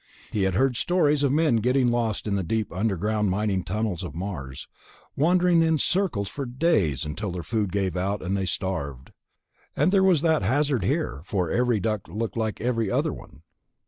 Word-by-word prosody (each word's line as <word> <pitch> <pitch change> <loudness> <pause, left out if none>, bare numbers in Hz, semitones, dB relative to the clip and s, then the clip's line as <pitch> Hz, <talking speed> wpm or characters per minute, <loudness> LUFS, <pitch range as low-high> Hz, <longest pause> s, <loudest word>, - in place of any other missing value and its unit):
He 100 -3 0
had 95 -2 0
heard 130 +2 +2
stories 150 -4 +2
of 140 -2 +2
men 150 -4 +3
getting 125 +3 +2
lost 115 -3 -1
in 105 - -1
the 100 - +1
deep 110 +4 -2
underground 105 +1 0
mining 95 -1 0
tunnels 100 -2 -2
on 85 -3 -7
Mars, 75 -9 -6 0.5
wandering 175 +2 +3
in 160 -1 +3
circles 155 - 0
for 135 +6 -5
days 120 - +1
until 95 +6 -4
their 85 -1 -5
food 105 -3 -1
gave 95 -3 -1
out 100 +3 -2
and 95 +2 -1
they 95 -1 -1
starved. 70 -8 -4 0.6
And 150 +6 +2
there 195 -1 +4
was 180 -6 +4
that 160 -5 +2
hazard 135 +4 +1
here, 70 -7 -1
for 90 -3 -2
every 125 -2 +2
duct 110 0 -2
looked 110 +1 -3
like 110 -2 -2
every 115 -3 0
other - - 0
one. 75 - -13
110 Hz, 185 wpm, -25 LUFS, 95-135 Hz, 0.6 s, there